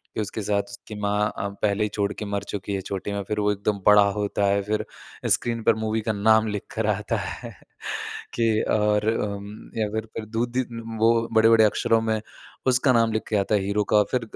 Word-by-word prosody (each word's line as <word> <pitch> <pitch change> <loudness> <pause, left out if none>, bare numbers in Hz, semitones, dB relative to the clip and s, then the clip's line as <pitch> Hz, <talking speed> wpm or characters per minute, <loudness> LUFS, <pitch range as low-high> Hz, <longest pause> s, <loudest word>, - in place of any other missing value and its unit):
कि - - 0
उसके 105 +1 -4
साथ 100 0 +1
उसकी 100 +1 -10
माँ 105 +1 +1 0.3
पहले 105 0 +1
ही 105 - 0
छोड़ 100 -1 -1
के 105 - -6
मर 100 0 -2
चुकी 100 0 -4
है - - -1
छोटी 100 +1 -4
में, 100 - -2
फिर 105 +2 -3
वो 105 0 +2
एकदम 100 0 -1
बड़ा 105 0 +8
होता 105 -1 0
है, 100 0 +2
फिर 105 +1 -1 0.4
स्क्रीन 115 -1 +1
पर 115 - +4
मूवी 110 0 0
का 110 - +2
नाम 110 +2 +4
लिखकर 105 +1 -3
आता 105 0 -2
है। - - -6 0.8
कि 115 -2 +2 0.2
और 105 0 +2
उम 100 -2 -3 0.3
या 110 -1 +1
फिर 110 0 -2
फिर 110 - -3
दूधि 120 +2 0 0.4
वो 115 +1 +5 0.2
बड़े-बड़े 110 0 +6
अक्षरों 115 +2 +2
में 110 -1 0 0.5
उसका 130 +1 +4
नाम 115 -2 +3
लिख 110 - 0
के 110 - +1
आता 100 +1 +1
है 105 - +3
हीरो 100 +2 0
का, 105 - +7
फिर 125 -2 +1
105 Hz, 205 wpm, -24 LUFS, 100-110 Hz, 0.8 s, बड़ा